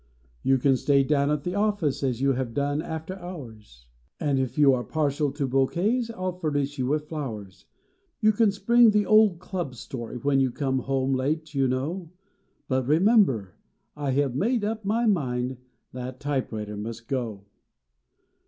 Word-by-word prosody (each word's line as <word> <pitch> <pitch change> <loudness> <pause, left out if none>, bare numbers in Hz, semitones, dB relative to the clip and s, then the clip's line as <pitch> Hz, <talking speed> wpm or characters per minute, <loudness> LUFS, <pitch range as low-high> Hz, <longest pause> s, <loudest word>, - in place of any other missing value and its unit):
"You 135 0 +3
can 130 +1 +3
stay 140 +1 +3
down 140 0 +1
at 150 -1 0
the 180 - -3
office, 205 -8 0
as 130 -3 -1
you 140 0 +3
have 125 -3 -3
done, 145 +1 0
after 160 +3 -6
hours; 115 - -10 0.3
And, 140 -3 +1
if 130 -1 -2
you 145 -2 +6
are 125 -1 0
partial 145 -1 0
to 145 -2 -2
bouquets, 180 - +1
I 230 - -8
ll 185 - +1
furnish 145 -5 -2
you 125 - 0
with 150 +2 -1
flowers. 110 - -6 0.5
You 215 -1 +5
can 215 0 +3
spring 235 +4 +5
the 210 -1 +2
old 215 -3 +5
club 175 -6 -5
story 120 0 -7
when 135 +2 +1
you 135 -1 +3
come 130 +1 -1
home 135 +1 0
late, 150 +4 -1
you 135 -2 +2
know, 155 +8 -2 0.6
But, 130 -2 0
remember, 155 - +3 0.4
I 145 -2 -3
ve 140 +1 +2
made 225 - 0
up 220 0 -3
my 225 +4 +1
mind 130 - 0 0.4
that 130 0 -6
typewriter 115 -7 -3
must 115 +2 -6
go. 115 -7 -3
140 Hz, 170 wpm, -26 LUFS, 130-175 Hz, 0.6 s, you